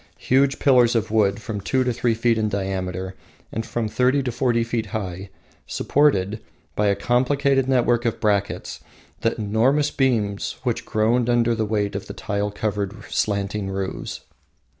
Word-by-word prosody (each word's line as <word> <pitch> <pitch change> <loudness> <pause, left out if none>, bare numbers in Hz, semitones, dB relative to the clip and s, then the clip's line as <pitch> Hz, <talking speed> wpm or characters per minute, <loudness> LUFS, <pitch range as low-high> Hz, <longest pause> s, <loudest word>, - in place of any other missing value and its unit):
Huge 135 +1 +2
pillars 125 -3 +4
of 110 -1 0
wood 100 -2 +2
from 105 -1 -5
two 130 +6 +1
to 125 -1 0
three 115 -1 +1
feet 115 0 +2
in 110 -1 +1
diameter 95 -2 -3 0.4
and 115 - -3
from 115 0 -2
thirty 130 +5 +2
to 125 - -2
forty 120 -1 +1
feet 115 -1 -2
high, 95 -2 -5 0.4
supported, 110 -8 +1 0.3
by 105 - +2
a 100 - +3
complicated 135 +4 +1
network 120 -2 +2
of 115 - -1
brackets, 100 -2 -1 0.4
the 115 - 0
enormous 120 +8 +2
beams 110 -7 0
which - - -1
groaned 115 +3 +1
under 120 -1 +3
the 110 -1 -1
weight 105 -1 0
of 100 - -5
the - - -8
tile 105 0 -2
covered 105 -1 -3
roofs. 100 -2 -3
110 Hz, 155 wpm, -23 LUFS, 100-125 Hz, 0.4 s, pillars